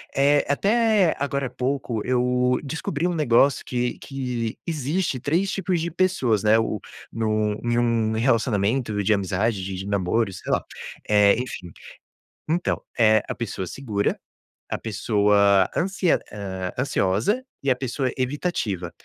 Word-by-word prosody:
eh, 145 Hz, +1 st, +4 dB
até 205 Hz, +3 st, +3 dB
agora 140 Hz, -2 st, -2 dB
pouco, 125 Hz, -3 st, -2 dB
eu 125 Hz, 0 st, +2 dB
descobri 155 Hz, +2 st, -2 dB
um 175 Hz, -, -1 dB
negócio, 140 Hz, -2 st, +3 dB
que 125 Hz, -1 st, -2 dB
que 125 Hz, -5 st, -4 dB
existe 155 Hz, -2 st, -1 dB
3 170 Hz, +9 st, 0 dB
tipos 185 Hz, -3 st, -1 dB
de 170 Hz, -, -2 dB
pessoas, 160 Hz, -, +1 dB
né, 110 Hz, +1 st, +5 dB
o 110 Hz, -2 st, -1 dB, 0.3 s
num 110 Hz, -2 st, 0 dB
em 120 Hz, 0 st, +1 dB
um 115 Hz, -2 st, +1 dB
relacionamento 110 Hz, -2 st, +1 dB
de 110 Hz, -, +1 dB
amizade, 100 Hz, +1 st, 0 dB
de 95 Hz, -, -4 dB
de 95 Hz, +2 st, -6 dB
namoro 100 Hz, +2 st, 0 dB
sei 90 Hz, -, -6 dB
lá, -, -, +1 dB, 0.8 s
enfim, 90 Hz, -9 st, -6 dB, 0.8 s
então, 175 Hz, +2 st, 0 dB, 0.2 s
eh, 110 Hz, -1 st, +5 dB
a -, -, -1 dB
pessoa 100 Hz, -5 st, -4 dB
segura, 105 Hz, -2 st, -2 dB, 0.5 s
a -, -, -1 dB
pessoa 100 Hz, -2 st, +3 dB
ansi 190 Hz, +1 st, -1 dB, 0.7 s
ansiosa 125 Hz, -, +1 dB, 0.2 s
e 140 Hz, -, +1 dB
a 125 Hz, -, +3 dB
pessoa 130 Hz, 0 st, -2 dB
evitativa, 125 Hz, -, -2 dB
125 Hz, 130 wpm, -24 LUFS, 105-145 Hz, 0.8 s, né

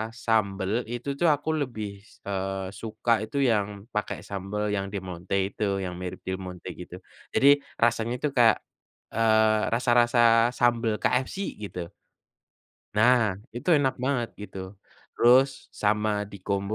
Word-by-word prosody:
sambel 110 Hz, -2 st, 0 dB
itu 120 Hz, +4 st, -3 dB
tuh 170 Hz, -, +4 dB
aku 145 Hz, +1 st, -1 dB
lebih, 105 Hz, -7 st, -5 dB
s -, -, -21 dB
eee, 95 Hz, -1 st, -3 dB
suka 110 Hz, +1 st, -1 dB
itu 110 Hz, +6 st, -6 dB
yang 105 Hz, -4 st, 0 dB
pakai 105 Hz, -1 st, -2 dB
sambel 100 Hz, +2 st, -3 dB
yang 100 Hz, -1 st, -1 dB
Del 100 Hz, -2 st, -4 dB
Monte 90 Hz, +1 st, -4 dB, 0.2 s
itu 100 Hz, -2 st, -1 dB
yang 90 Hz, -1 st, -4 dB
mirip 90 Hz, -1 st, -6 dB
Del 95 Hz, 0 st, -3 dB
Monte 90 Hz, -1 st, -8 dB
gitu. -, -, -9 dB, 0.4 s
Jadi 140 Hz, +1 st, +6 dB, 0.2 s
rasanya 115 Hz, 0 st, +2 dB
itu 150 Hz, -, 0 dB
kayak, 115 Hz, -2 st, +6 dB, 0.6 s
eee, 110 Hz, -1 st, +3 dB
rasa-rasa 120 Hz, -1 st, +4 dB
sambel 115 Hz, -2 st, +2 dB
KFC 130 Hz, +10 st, -1 dB
gitu. 90 Hz, -4 st, -6 dB, 1.1 s
Nah, 110 Hz, -3 st, +4 dB, 0.2 s
itu 120 Hz, -, -6 dB
enak 135 Hz, -3 st, +1 dB
banget 125 Hz, -4 st, 0 dB
gitu. 105 Hz, -1 st, -8 dB, 0.5 s
Terus 130 Hz, +3 st, +5 dB, 0.3 s
sama 105 Hz, +1 st, +2 dB, 0.2 s
di 100 Hz, -, -9 dB
kombo 100 Hz, +1 st, -1 dB
110 Hz, 140 wpm, -26 LUFS, 100-120 Hz, 1.1 s, Jadi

